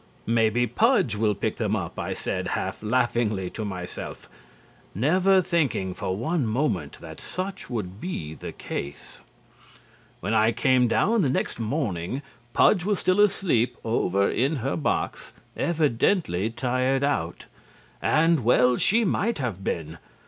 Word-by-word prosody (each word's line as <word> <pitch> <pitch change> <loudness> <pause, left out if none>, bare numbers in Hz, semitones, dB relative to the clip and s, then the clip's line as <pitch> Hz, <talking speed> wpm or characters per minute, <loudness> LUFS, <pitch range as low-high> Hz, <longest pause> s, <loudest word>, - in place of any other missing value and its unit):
"Maybe 115 +1 +2
Pudge 140 - +2
will 105 -1 +1
pick 110 +2 -2
them 110 -2 0
up," 90 -6 -4
I - - -2
said - - -3
half - - -4
laughingly 110 -4 0
to 110 - -5
myself, 90 -3 -6 0.7
never 185 - +3
thinking 140 - 0
for 95 +1 -3
one 140 +3 0
moment 110 - -1
that - - -10
such 190 +2 -5
would 105 -4 -5
be 80 - -4
the - - -7
case. 70 +1 -7 1.0
When 110 - -2
I 110 +1 +4
came 130 0 +3
down 220 - +2
the 145 - +2
next 130 - -1
morning 115 - -2 0.3
Pudge 180 - +4
was 205 +1 +1
still 185 +2 +1
asleep 190 - +2
over 100 -3 +1
in 135 +6 +1
her - - 0
box, 80 - -2 0.2
evidently 150 - +1
tired 130 +3 0
out. 90 - -1 0.6
And 160 -3 +3
well 125 +1 +4
she 225 +2 +3
might 205 +5 0
have 115 - -3
been. 80 -2 -3
120 Hz, 140 wpm, -25 LUFS, 100-160 Hz, 1.0 s, I